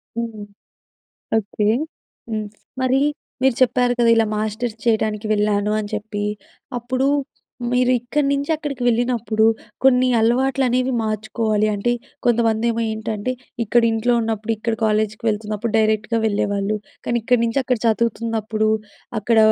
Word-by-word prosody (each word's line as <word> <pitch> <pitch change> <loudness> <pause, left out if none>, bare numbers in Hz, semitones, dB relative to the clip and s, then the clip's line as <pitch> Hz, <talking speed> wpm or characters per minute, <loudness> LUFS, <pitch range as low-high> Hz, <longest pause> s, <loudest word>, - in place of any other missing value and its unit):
హ్మ్. 225 -3 -4 0.9
ఓకె. 210 0 -1 0.6
హ్మ్. 215 -1 -2 0.4
మరి 260 +1 +3 0.4
మీరు 265 -3 +4
చెప్పారు 245 0 +3
కదా! 235 -1 +4
ఇలా 225 - +4
మాస్టర్స్ 220 +2 -2
చేయడానికి 220 -2 +1
వెళ్ళాను 210 0 +1
అని 205 - -6
చెప్పి. 210 -1 -4 0.6
అప్పుడు 255 +3 0 0.6
మీరు 250 0 +3
ఇక్కడి 275 +4 -1
నుంచి 280 +2 -1
అక్కడికి 285 -5 -5
వెళ్ళినప్పుడు 235 -2 +2 0.4
కొన్ని 255 -1 +5
అలవాట్లు 260 +4 +2
అనేవి 255 +1 +1
మార్చుకోవాలి. 215 0 0
అంటే 205 +4 0 0.3
కొంతమంది 230 -1 +2
ఏమో 230 0 -2
ఏంటంటే 220 +2 -3 0.3
ఇక్కడ 235 +2 +3
ఇంట్లో 225 +2 +1
ఉన్నప్పుడు 225 0 -2
ఇక్కడ 225 +2 -2
కాలేజ్‌కి 215 0 0
వెళ్తున్నప్పుడు 215 +1 -1
డైరెక్ట్‌గా 220 +1 +2
వెళ్ళేవాళ్ళు. 205 -1 0 0.3
కానీ 240 - +1
ఇక్కడి 245 +1 +2
నుంచి 230 +4 +1
అక్కడ 250 -1 +1
చదువుతున్నప్పుడు 225 -1 0 0.5
అక్కడ 225 +2 +1
225 Hz, 125 wpm, -21 LUFS, 215-245 Hz, 0.9 s, కొన్ని